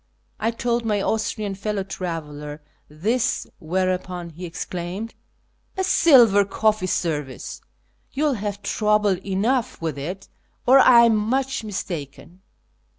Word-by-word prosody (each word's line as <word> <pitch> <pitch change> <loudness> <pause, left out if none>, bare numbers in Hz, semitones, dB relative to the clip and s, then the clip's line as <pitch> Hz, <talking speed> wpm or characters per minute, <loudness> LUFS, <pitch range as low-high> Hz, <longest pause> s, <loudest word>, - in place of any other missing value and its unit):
I 220 - +1
told 235 0 -1
my 210 -2 0
Austrian 215 -1 -1
fellow 200 0 -3
traveller 150 -5 -6 0.3
this, 225 - 0
whereupon 180 0 -2
he 175 +3 -7
exclaimed: 180 +6 -5 0.3
" - - -41
A 380 - +1
silver 245 - +6
coffee 210 0 0
service! 150 -7 -3 0.5
You 285 - -2
will 300 -2 +3
have 205 -2 -4
trouble 210 -3 +1
enough 230 +6 0
with 160 -4 -3
it, 180 +7 -6 0.4
or 265 +2 +7
I 245 -3 +8
am 230 -2 +5
much 255 +5 0
mistaken. 175 -4 -6
200 Hz, 125 wpm, -23 LUFS, 175-225 Hz, 0.5 s, I